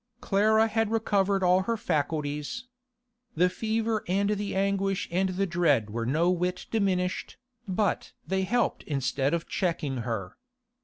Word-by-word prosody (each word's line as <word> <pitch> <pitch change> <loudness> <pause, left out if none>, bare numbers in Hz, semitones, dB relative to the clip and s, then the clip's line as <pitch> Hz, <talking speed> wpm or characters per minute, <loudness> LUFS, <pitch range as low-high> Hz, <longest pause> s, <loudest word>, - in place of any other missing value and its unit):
Clara 220 -1 +3
had 225 -1 0
recovered 200 -3 +1
all 180 +1 +4
her 230 +4 -1
faculties. 150 - -2 0.7
The 180 +3 +4
fever 220 +1 -1
and 200 +3 +1
the 205 -1 -2
anguish 195 0 0
and 190 +2 +1
the 185 +2 0
dread 155 - +2
were 115 +1 -2
no 165 +7 +2
whit 180 0 -1
diminished, 190 -4 0 0.3
but 195 +1 0
they 190 0 0
helped 240 +6 0
instead 135 +1 0
of 165 - -4
checking 155 -7 -1
her. 110 -6 -4
185 Hz, 140 wpm, -28 LUFS, 155-205 Hz, 0.7 s, all